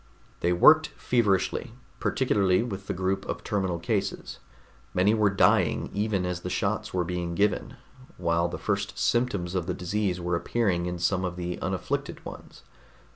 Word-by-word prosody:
They 85 - +1
worked 155 - +6
feverishly, 115 -1 +1 0.3
particularly 100 -6 +2
with 95 -5 -6
the 100 - -1
group 95 +1 -1
of - - -4
terminal 95 -5 -1
cases. 85 - -2 0.6
Many 95 +4 +4
were 105 -2 +3
dying 95 - +2
even 100 -3 0
as 90 -1 -2
the 90 - -4
shots 105 +3 -1
were 90 -1 0
being 85 -1 -3
given, 100 +2 0 0.4
while 85 -1 +1
the 85 - -5
first 100 +1 -2
symptoms 105 -8 0
of 90 -3 -1
the 90 - -1
disease 95 0 -1
were 85 0 -1
appearing 90 -2 0
in 90 0 -3
some 90 +2 0
of 90 -1 -2
the 90 0 -4
unafflicted - - -3
ones. - - -10
95 Hz, 160 wpm, -27 LUFS, 90-105 Hz, 0.6 s, worked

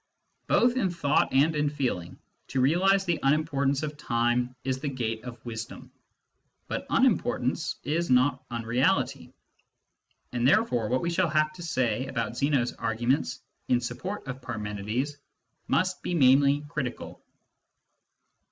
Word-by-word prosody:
Both 245 +1 +3
in 200 -7 +2
thought 160 -4 +1
and 145 +4 +3
in 150 -1 +1
feeling, 125 - -3 0.3
to 135 - -2
realise 185 +9 +3
the 175 -3 0
unimportance 140 -1 +1
of 150 -1 -4
time 120 -1 0
is 130 0 -1
the 145 +1 -2
gate 115 -4 -3
of 120 -1 -8
wisdom. 115 -1 -7 0.8
But - - -4
unimportance - - +1
is 165 +6 -1
not 130 +1 +3
unreality; 115 +1 0 1.0
and 120 0 +1
therefore 135 - +2
what 130 +1 +1
we 170 - -1
shall 175 0 +1
have 155 0 +1
to 175 - -11
say 130 -6 -1
about 115 -4 -3
Zeno's 135 -2 +1
arguments 120 +5 -1 0.2
in 125 - +3
support 185 +11 -5
of 135 0 -6
Parmenides 110 +4 -3 0.5
must 185 +1 +1
be 175 - -2
mainly 140 0 +5
critical. 135 -4 -5
135 Hz, 135 wpm, -27 LUFS, 120-155 Hz, 1.0 s, mainly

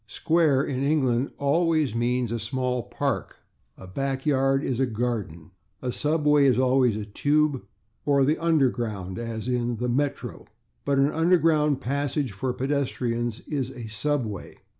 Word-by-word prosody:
/Square/, 155 -4 +2
in 130 -2 -3
England, 135 -3 +1
always 155 -2 +1
means 120 0 0
a 115 - -2
small 125 0 -1
park. 135 +4 -3 0.4
A - - -11
backyard 135 +5 0
is 130 -2 -1
a 135 - +2
/garden/. 110 -9 -3 0.3
A 125 - -3
subway 150 0 +3
is 125 -3 +3
always 130 -3 +3
a 105 - -4
/tube/, 145 +6 +1 0.4
or 140 -2 +3
the 150 +3 +2
/underground/, 120 - 0
or 115 -1 -4 0.4
the 125 +2 -2
/Metro/. 140 +4 -2 0.4
But 140 -1 +1
an 140 +2 +3
underground 160 -4 +3
passage 140 0 -1
for 125 +7 -2
pedestrians 125 -4 -2
is 135 -4 -3
a 125 -3 -9
/subway 110 -1 -3
135 Hz, 140 wpm, -25 LUFS, 120-145 Hz, 0.4 s, subway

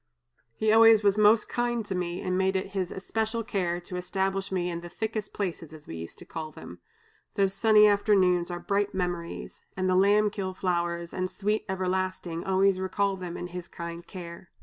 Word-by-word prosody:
He 215 0 +2
always 225 -1 +7
was 200 -1 +4
most 215 +1 +5
kind 240 -2 -1
to 200 - -3
me 180 -1 -3
and 185 0 -1
made 190 +1 +1
it 190 0 -1
his 190 -3 -2
especial 220 +4 -2
care 180 -6 -1
to 180 +1 -7
establish 195 +2 -1
me 180 -2 0
in 170 -1 -4
the 175 - -8
'thickest 215 +4 -4
places,' 170 -5 -4
as 155 -2 -12
we - - -7
used 85 0 -8
to - - -12
call 160 -2 -6
them. - - -11 0.6
Those 195 -2 +2
sunny 215 0 +6
afternoons 195 -4 +3
are 175 0 -4
bright 200 +3 -1
memories, 175 -2 -4 0.2
and 185 0 0
the 185 - +3
lamb 205 +2 +4
kill 190 -3 -4
flowers 170 -2 -1
and 185 0 -2
sweet 210 +3 -1
'everlasting,' 185 -2 -2
always 190 0 +2
recall 195 +1 0
them 180 -2 -6
and 175 0 -6
his 180 -1 -6
kind 170 0 -7
care. 170 -1 -9
190 Hz, 195 wpm, -28 LUFS, 175-205 Hz, 0.6 s, always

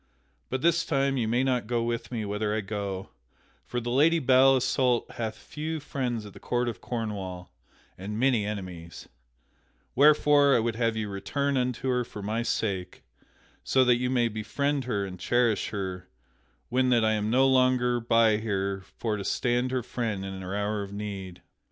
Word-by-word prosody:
But 130 +2 -3
this 170 0 +3
time 135 -2 +1
you 120 -4 0
may 120 +3 +2
not 125 -4 0
go 120 -1 0
with 115 0 -3
me 115 -3 -3
whither 105 +1 -1
I 110 - 0
go, 100 -2 -4 0.6
for 120 - -2
the 120 0 -4
Lady 155 +6 +4
Belle 135 -2 +5
Isoult 130 -1 +1
hath 110 -2 -4
few 155 +1 -5
friends 125 -6 -3
at 100 - -11
the - - -12
court 120 0 -1
of 115 - -4
Cornwall, 100 -6 -5 0.5
and 105 +3 -5
many 125 -4 +3
enemies, 90 -5 -6 0.9
wherefore 145 0 +5
I - - +4
would 115 0 -1
have 115 -1 0
you 110 -1 -2
return 140 +8 -2
unto 125 0 -1
her 125 -1 +1
for 105 -3 -9
my 110 +3 -1
sake, 100 -6 -2 0.6
so 130 -1 +3
that 125 -1 +4
you 125 +1 -1
may 120 -2 +2
befriend 135 +6 -2
her 100 -5 -1
and 90 -2 -8
cherish 120 +1 +1
her 95 -3 -5 0.6
when 130 +1 +2
that 120 -3 +4
I 110 - +3
am 105 0 -1
no 130 +3 +4
longer 130 -2 +3
by 115 -2 +3
her 100 -3 -2 0.2
for 110 -2 -1
to 100 - -5
stand 125 +4 0
her 130 -1 -1
friend 110 -5 -3
in 95 -1 -6
her 95 +1 -5
hour 105 +1 -1
of 100 -1 -7
need. 100 -3 -6
115 Hz, 180 wpm, -27 LUFS, 105-130 Hz, 0.9 s, Belle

